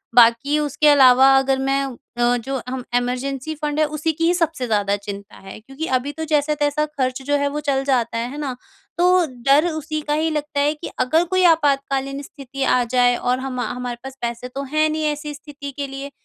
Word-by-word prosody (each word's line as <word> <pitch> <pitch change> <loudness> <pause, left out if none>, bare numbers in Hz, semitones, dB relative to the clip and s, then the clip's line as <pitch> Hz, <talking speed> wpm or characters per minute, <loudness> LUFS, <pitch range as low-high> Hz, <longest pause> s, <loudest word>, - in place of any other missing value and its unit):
बाकी 240 +5 +5
उसके 300 +1 +1
अलावा 270 -2 +7
अगर 270 0 +2
मैं 270 +1 +1 0.3
अ, 240 0 +3
जो 265 +3 -4
हम 255 0 -4
इमरजेंसी 255 +4 -2
फंड 300 0 -1
है 310 - +4
उसी 305 +2 -1
की 330 +2 -1
ही 345 - +4
सबसे 330 -6 -1
ज़्यादा 205 -2 +1
चिंता 200 0 -8
है। 195 +1 -11
क्योंकि 270 +8 -7
अभी 270 +3 -5
तो 320 - -3
जैसा-तैसा 295 0 +1
ख़र्च 265 -3 -3
जो 290 - +2
है 285 0 0
वो 295 +1 -3
चल 270 -1 +1
जाता 245 -4 0
है, 235 +1 -2
है 290 - -7
ना। 280 -4 -3 0.4
तो 360 0 +4 0.2
डर 285 +5 +5
उसी 310 -1 -4
का - - +3
ही 315 +2 +1
लगता 300 -1 -3
है 290 +1 +2
कि 310 +2 -8
अगर 315 +7 +3
कोई 370 0 +3
आपातकालीन 275 -3 0
स्थिति 275 -1 -7
आ 250 -1 +3
जाए 245 +1 +3
और 250 +1 0
हम 260 -1 -4
हमारे 245 0 -4
पास 265 0 -9
पैसे 235 +1 -4
तो 270 +2 -6
हैं 310 +3 +1
नहीं 310 0 -2
ऐसी 295 0 -6
स्थिति 285 -1 -9
के 280 +1 -5
लिए। 275 +1 -7
275 Hz, 210 wpm, -21 LUFS, 250-300 Hz, 0.4 s, अलावा